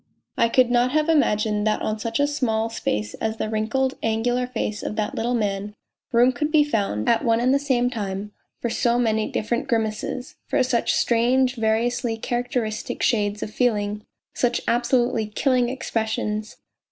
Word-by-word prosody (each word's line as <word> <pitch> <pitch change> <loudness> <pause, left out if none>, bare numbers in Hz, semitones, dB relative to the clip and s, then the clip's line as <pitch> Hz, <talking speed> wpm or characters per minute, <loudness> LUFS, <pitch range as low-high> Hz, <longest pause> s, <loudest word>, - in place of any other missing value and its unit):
I 230 - +3
could 250 0 +3
not 245 +2 +2
have 310 +1 +2
imagined 215 -8 +2
that 215 - 0
on 215 0 -2
such 225 +3 -2
a 285 - +4
small 230 -6 -1
space 105 - -2
as 220 0 -1
the 215 - -2
wrinkled, 235 +5 0
angular 245 +3 0
face 215 -4 -3
of - - -4
that 215 -1 -2
little 240 +2 -1
man 205 -2 -2 0.4
room 245 +2 +5
could 300 +5 -2
be 305 -2 +5
found, 200 - -1
at 230 - +3
one 230 -2 +3
and 250 +2 +3
the 280 - +3
same 260 -4 +1
time, 205 -2 -4 0.3
for 235 - -1
so 240 -1 +1
many 220 -3 +1
different 235 +5 -2
grimaces, 225 +2 -2
for - - +2
such 245 -2 +1
strange, 250 +2 +2
variously 225 +1 0
characteristic 240 -2 -2
shades 210 -3 +1
of 210 - -6
feeling, 210 -4 0 0.3
such 245 -1 +1
absolutely 240 -2 +1
killing 245 +3 +1
expressions. 220 -3 -3
230 Hz, 165 wpm, -23 LUFS, 215-250 Hz, 0.4 s, room